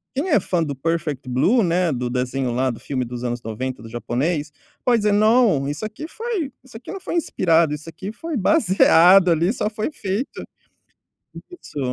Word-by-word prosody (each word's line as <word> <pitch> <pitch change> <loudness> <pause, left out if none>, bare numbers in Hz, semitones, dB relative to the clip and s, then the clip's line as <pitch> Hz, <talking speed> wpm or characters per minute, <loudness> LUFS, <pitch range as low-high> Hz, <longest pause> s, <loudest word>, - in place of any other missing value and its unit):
quem 295 +8 -1
é 300 - +4
fã 175 -2 -1
do 145 -3 -2
Perfect 150 -2 -3
Blue, 185 - +3
né, 175 -1 +1
do 125 -1 -3
desenho 125 +1 -2
lá, 130 +2 +1
do 120 - -5
filme 130 -3 -3
dos 120 0 -7
anos 120 -1 -3
90, 125 +3 -5
do 115 - -10
japonês, 145 +7 -2 0.3
pode 240 -2 +3
dizer: 210 -1 +1
“Não, 215 - +3
isso 150 +9 -4
aqui 220 +9 -7
foi 445 - -3
isso 260 -3 -18
aqui 225 - -9
não 390 - -6
foi 370 - -5
inspirado, 165 - +2
isso 150 +2 -7
aqui 180 +5 -7
foi 325 +7 -6
baseado, 190 - +5
ali, 170 +5 +2
só 210 - -1
foi 215 +2 -3
feito” 210 0 -4 1.1
isso. 355 - -10
170 Hz, 185 wpm, -21 LUFS, 130-220 Hz, 1.1 s, baseado